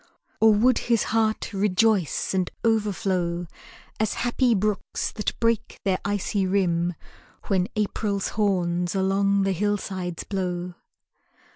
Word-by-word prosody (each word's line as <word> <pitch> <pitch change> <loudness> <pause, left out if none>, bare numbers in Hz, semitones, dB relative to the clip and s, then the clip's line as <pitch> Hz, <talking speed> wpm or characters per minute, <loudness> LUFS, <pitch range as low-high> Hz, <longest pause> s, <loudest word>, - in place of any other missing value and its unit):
Or 220 0 +6
would 230 +4 +4
his 230 -2 +3
heart 220 -1 +1
rejoice 200 -3 +1
and 185 -2 0
overflow, 190 -6 0 0.5
As 215 -1 0
happy 245 0 +2
brooks 210 +1 -1
that 210 - -3
break 230 -2 0
their 190 -2 +1
icy 200 -1 -1
rim 175 -3 +1 0.5
When 190 -2 +1
April's 205 -1 -1
horns 180 -4 0
along 195 +1 +2
the 195 - +1
hillsides 190 -2 -2
blow? 180 -2 -3
195 Hz, 115 wpm, -25 LUFS, 180-215 Hz, 0.5 s, Or